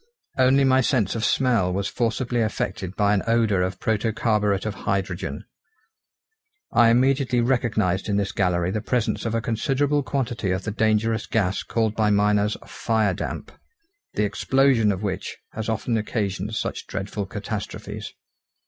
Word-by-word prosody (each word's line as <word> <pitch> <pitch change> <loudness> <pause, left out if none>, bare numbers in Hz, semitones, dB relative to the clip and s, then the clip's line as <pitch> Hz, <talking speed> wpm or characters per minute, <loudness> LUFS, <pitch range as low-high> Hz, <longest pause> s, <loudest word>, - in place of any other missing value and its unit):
Only 130 +1 +4
my 130 0 +4
sense 120 -7 +1
of 115 - -3
smell 115 -7 +2
was 100 +2 -1
forcibly 120 +1 -1
affected 100 -3 -2
by 105 0 +3
an 100 - +2
odour 115 -5 +2
of 95 0 -2
protocarburet 105 -2 0
of 110 - -2 0.2
hydrogen. 95 -1 -2 1.3
I 120 -1 +5
immediately 130 +1 +3
recognised 110 -7 +1
in 100 - +1
this 100 -2 0
gallery 90 -2 +1
the 110 - -2
presence 120 0 -1
of 115 - -1
a 115 - +1
considerable 140 +6 +1
quantity 125 -7 -2
of 95 +1 -1
the 105 - -3
dangerous 110 +1 +1
gas 100 -4 0
called 110 -2 0
by 110 -1 +2
miners 105 0 +2
firedamp, 110 -5 -1 0.7
the 105 - +1
explosion 120 +1 +3
of 95 +1 -4
which 95 -3 -3
has 110 +1 -4
often 115 +1 -1
occasioned 105 -1 -2
such - - -3
dreadful 100 +1 -4
catastrophes. 105 +1 -5
110 Hz, 145 wpm, -24 LUFS, 100-120 Hz, 1.3 s, I